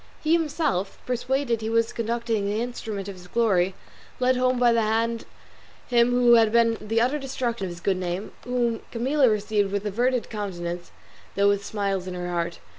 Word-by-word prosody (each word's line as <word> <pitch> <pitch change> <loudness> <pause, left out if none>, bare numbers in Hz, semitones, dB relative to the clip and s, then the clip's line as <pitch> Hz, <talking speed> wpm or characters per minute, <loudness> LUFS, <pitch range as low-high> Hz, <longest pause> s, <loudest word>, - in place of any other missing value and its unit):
He 315 +1 +3
himself, 300 - 0
persuaded 250 -1 -1
he 220 - -2
was 230 0 +1
conducting 230 -2 -1
the 210 +2 -1
instrument 220 -4 -4
of 200 - -5
his 180 -1 -13
glory, 190 -4 +2 0.4
led 255 0 +3
home 255 0 +2
by 245 -1 +4
the 230 - +3
hand 225 +1 0 0.6
him 240 -1 +4
who 245 -1 +5
had 225 -2 +5
been 230 0 +4
the 225 +2 0
utter 255 +6 +1
destruction 250 -6 -3
of - - -4
his 170 0 -9
good 190 0 +1
name; 180 +2 -3
whom 240 -2 0
Camilla 260 +3 +2
received 210 -1 0
with 200 +1 -2
averted 245 +4 0
countenance, 175 -5 -4 0.5
though 200 0 +4
with 200 0 +1
smiles 200 -2 -2
in 180 - -5
her 175 0 -4
heart. 170 0 -2
225 Hz, 185 wpm, -25 LUFS, 200-245 Hz, 0.6 s, who